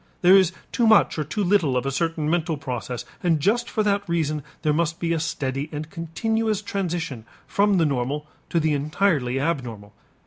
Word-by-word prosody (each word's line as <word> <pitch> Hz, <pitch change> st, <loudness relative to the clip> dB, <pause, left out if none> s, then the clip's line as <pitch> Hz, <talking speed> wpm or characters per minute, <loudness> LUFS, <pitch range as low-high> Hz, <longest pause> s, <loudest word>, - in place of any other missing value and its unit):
There 180 Hz, +2 st, +8 dB
is 190 Hz, -3 st, +5 dB, 0.2 s
too 235 Hz, -2 st, +2 dB
much 220 Hz, -6 st, +5 dB
or -, -, +1 dB
too 200 Hz, +8 st, -2 dB
little 175 Hz, -9 st, +2 dB
of 125 Hz, -, -1 dB
a 135 Hz, -, 0 dB
certain 160 Hz, +1 st, -1 dB
mental 165 Hz, -1 st, 0 dB
process 125 Hz, -2 st, -5 dB, 0.2 s
and 165 Hz, -3 st, +2 dB
just 230 Hz, +10 st, +1 dB
for 215 Hz, -, 0 dB
that 200 Hz, -2 st, 0 dB
reason 155 Hz, -3 st, 0 dB, 0.2 s
there 150 Hz, -2 st, +2 dB
must 165 Hz, +1 st, 0 dB
be 170 Hz, -1 st, 0 dB
a 165 Hz, -, 0 dB
steady 140 Hz, -2 st, -2 dB
and 155 Hz, +1 st, -6 dB
continuous 215 Hz, +6 st, -1 dB
transition 170 Hz, -, -3 dB, 0.2 s
from 200 Hz, -1 st, +2 dB
the 165 Hz, -, +3 dB
normal 140 Hz, +1 st, -1 dB, 0.2 s
to 170 Hz, -, +1 dB
the 155 Hz, -1 st, +1 dB
entirely 145 Hz, -3 st, +1 dB
abnormal. 120 Hz, -9 st, -3 dB
165 Hz, 185 wpm, -24 LUFS, 140-190 Hz, 0.2 s, There